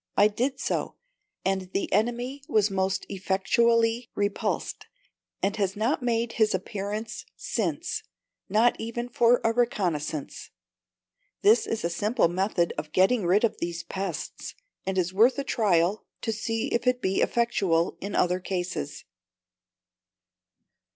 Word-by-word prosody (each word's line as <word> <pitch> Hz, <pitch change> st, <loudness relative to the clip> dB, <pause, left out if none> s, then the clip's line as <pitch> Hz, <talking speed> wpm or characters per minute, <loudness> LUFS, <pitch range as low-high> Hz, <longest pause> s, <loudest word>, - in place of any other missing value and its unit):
I 205 Hz, +1 st, +6 dB
did 260 Hz, +6 st, -1 dB
so, -, -, -2 dB, 0.5 s
and 190 Hz, -1 st, -1 dB
the 195 Hz, -, -1 dB
enemy 240 Hz, +6 st, 0 dB
was 215 Hz, -1 st, +2 dB
most 190 Hz, 0 st, 0 dB
effectually 230 Hz, +5 st, +2 dB
repulsed, 205 Hz, 0 st, -2 dB, 0.6 s
and 200 Hz, +1 st, +1 dB
has 195 Hz, -2 st, 0 dB
not 230 Hz, +8 st, 0 dB
made 235 Hz, -1 st, 0 dB
his 220 Hz, -3 st, +2 dB
appearance 205 Hz, +3 st, -4 dB
since -, -, -2 dB, 0.5 s
not 230 Hz, +3 st, +4 dB
even 235 Hz, +2 st, -4 dB
for 240 Hz, 0 st, +4 dB
a 225 Hz, -, +2 dB
reconnaissance!" 175 Hz, -, -1 dB, 0.9 s
This 220 Hz, +3 st, +5 dB
is 225 Hz, -, -2 dB
a -, -, +1 dB
simple 210 Hz, +2 st, +2 dB
method 180 Hz, -1 st, 0 dB
of 155 Hz, 0 st, -7 dB
getting 190 Hz, +1 st, +3 dB
rid 195 Hz, +5 st, +4 dB
of 230 Hz, -, +1 dB
these 170 Hz, -1 st, -3 dB
pests, 190 Hz, 0 st, -5 dB, 0.3 s
and 190 Hz, 0 st, -1 dB
is 185 Hz, 0 st, 0 dB
worth 230 Hz, +8 st, +5 dB
a 280 Hz, -, -1 dB
trial 195 Hz, -4 st, +1 dB
to 225 Hz, -, -1 dB
see 225 Hz, +4 st, -2 dB
if 235 Hz, +2 st, 0 dB
it 250 Hz, 0 st, +3 dB
be 190 Hz, -5 st, 0 dB
effectual 195 Hz, -8 st, +1 dB
in 200 Hz, +1 st, -4 dB
other 180 Hz, +1 st, +2 dB
cases. 175 Hz, -5 st, -4 dB
205 Hz, 135 wpm, -27 LUFS, 185-235 Hz, 0.9 s, I